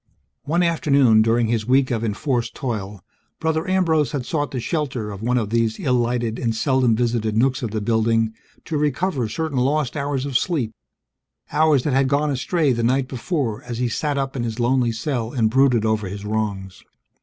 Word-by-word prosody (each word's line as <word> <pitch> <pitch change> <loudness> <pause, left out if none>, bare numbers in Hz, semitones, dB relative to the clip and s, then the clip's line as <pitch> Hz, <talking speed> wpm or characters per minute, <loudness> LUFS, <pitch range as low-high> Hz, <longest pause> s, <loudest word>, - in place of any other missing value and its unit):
One 170 +5 +1
afternoon 140 -9 +4
during 115 +1 +2
his 110 -1 -1
week 130 +1 +3
of 115 -2 -1
enforced 115 +3 -1
toil, 105 -6 -4 0.4
Brother 160 +2 -1
Ambrose 165 -6 +2
had 135 -4 -2
sought 145 -1 -1
the 130 - -4
shelter 130 -6 -2
of 100 0 -8
one 125 +2 +1
of 110 -3 -2
these 115 -1 +1
ill 130 - 0
lighted 120 -1 0
and 115 -2 -1
seldom 130 -1 +2
visited 115 -2 0
nooks 130 +3 +2
of 120 - -2
the 110 0 -3
building 115 0 +1 0.3
to 155 - -2
recover 145 - 0
certain 145 +3 -2
lost 140 0 0
hours 140 -2 -2
of 135 -3 +1
sleep, 140 -11 -1 0.8
hours 150 -3 +3
that 150 - 0
had 135 0 +3
gone 145 +2 +1
astray 140 +2 +1
the 120 - -1
night 130 +3 +1
before 130 - -2
as 120 -2 -6
he 125 0 0
sat 145 +5 -1
up 135 0 -2
in 125 - -2
his 115 0 -4
lonely 120 0 +2
cell 115 0 -3
and 110 -5 +1
brooded 125 -3 +3
over 110 -2 0
his 100 +2 -7
wrongs. 100 -3 -3
125 Hz, 190 wpm, -22 LUFS, 110-140 Hz, 0.8 s, afternoon